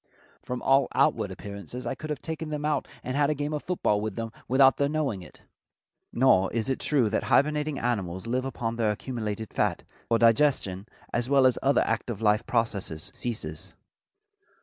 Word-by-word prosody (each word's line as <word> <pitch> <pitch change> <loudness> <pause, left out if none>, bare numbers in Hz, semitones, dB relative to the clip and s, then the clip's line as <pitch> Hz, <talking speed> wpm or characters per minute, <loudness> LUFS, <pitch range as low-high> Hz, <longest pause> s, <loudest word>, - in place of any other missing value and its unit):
From 125 -1 -5
all 135 0 +4
outward - - +2
appearances 100 +4 -8
I - - -1
could 155 - -8
have 150 -3 -4
taken 160 -1 -4
them 150 -1 -3
out 150 -2 0 0.2
and 130 - -3
had 145 0 +3
a 150 - +1
game 145 +1 -3
of 150 - -2
football 105 - 0
with 105 -2 -3
them 115 -1 -4 0.2
without 135 0 +5
their 140 0 +1
knowing 145 -10 -1
it." 90 - -15 0.7
Nor 115 -7 +4
is 115 +1 -1
it 130 - -1
true 135 -7 +2
that - - 0
hibernating 150 0 +2
animals 95 -7 -2
live 125 +2 -1
upon 115 -3 -3
their 110 -2 +2
accumulated 110 -1 -4
fat, - - 0 0.2
for 115 - +3
digestion, 115 -5 +2 0.3
as 120 +1 0
well 140 -2 +5
as 130 - +3
other 140 +1 +3
active 110 -1 -2
life 105 +1 +2
processes, 100 -7 -1
ceases. 90 -7 -4
120 Hz, 180 wpm, -27 LUFS, 105-140 Hz, 0.7 s, without